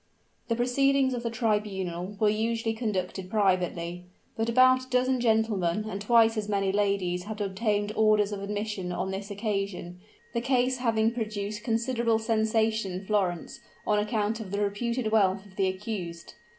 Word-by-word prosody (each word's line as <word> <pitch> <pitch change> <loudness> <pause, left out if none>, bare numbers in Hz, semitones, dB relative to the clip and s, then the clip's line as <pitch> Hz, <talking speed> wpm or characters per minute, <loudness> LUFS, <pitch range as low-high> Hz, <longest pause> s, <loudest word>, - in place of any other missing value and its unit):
The 230 - +1
proceedings 265 +2 +2
of 245 - -3
the 235 - -2
tribunal 205 -5 -2
were 215 - +4
usually 225 +2 0
conducted 190 -5 -3
privately; 180 -4 0 0.3
but 225 +1 -1
about 255 +2 +5
a - - -22
dozen 255 +1 +2
gentlemen 215 -5 +1
and 200 -2 -4
twice 225 +1 +4
as 210 -1 -2
many 195 -2 +1
ladies 195 -3 0
had 215 0 -6
obtained 205 +1 0
orders 215 -1 +3
of 200 -1 -4
admission 205 -2 -3
on 180 +2 -2
this 195 +2 -5
occasion, 195 -4 -3 0.3
the 235 - 0
case 255 0 +2
having 225 -2 +2
produced 215 -2 -4
considerable 230 0 +1
sensation 220 -2 +1
in 185 +2 -5
Florence, 190 -4 -1 0.3
on 210 -1 +2
account 215 +1 -1
of 215 -4 -7
the 200 +2 -2
reputed 220 +3 -1
wealth 195 -2 +2
of 190 -2 -17
the 190 -1 +2
accused. 185 -3 -5
210 Hz, 160 wpm, -28 LUFS, 195-230 Hz, 0.3 s, about